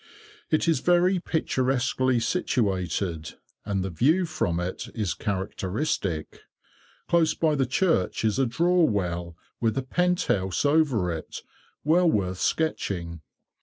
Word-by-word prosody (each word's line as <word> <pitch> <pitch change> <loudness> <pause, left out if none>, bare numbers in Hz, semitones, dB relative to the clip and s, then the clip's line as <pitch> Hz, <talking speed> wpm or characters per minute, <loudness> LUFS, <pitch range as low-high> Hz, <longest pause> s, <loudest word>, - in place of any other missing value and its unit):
It 155 +2 +1
is 165 -5 +3
very 180 +3 +3
picturesquely 130 -5 0
situated, 95 - -1 0.3
and 100 -2 -1
the 95 - -4
view 155 - +2
from 155 - -1
it 90 +1 -4
is 105 -6 -1
characteristic. 95 - -3 0.7
Close 170 -2 +3
by 160 -2 +2
the 135 -3 +1
church 130 - +1
is 110 +4 +1
a 135 - +3
draw 175 +8 +2
well, 85 - -1 0.2
with 115 +1 0
a 135 - 0
pent 180 +6 +1
house 95 - 0
over 145 - +2
it, 80 -1 -6 0.4
well 170 +3 +4
worth 95 - -1
sketching. 85 - -1
120 Hz, 130 wpm, -26 LUFS, -, 0.7 s, well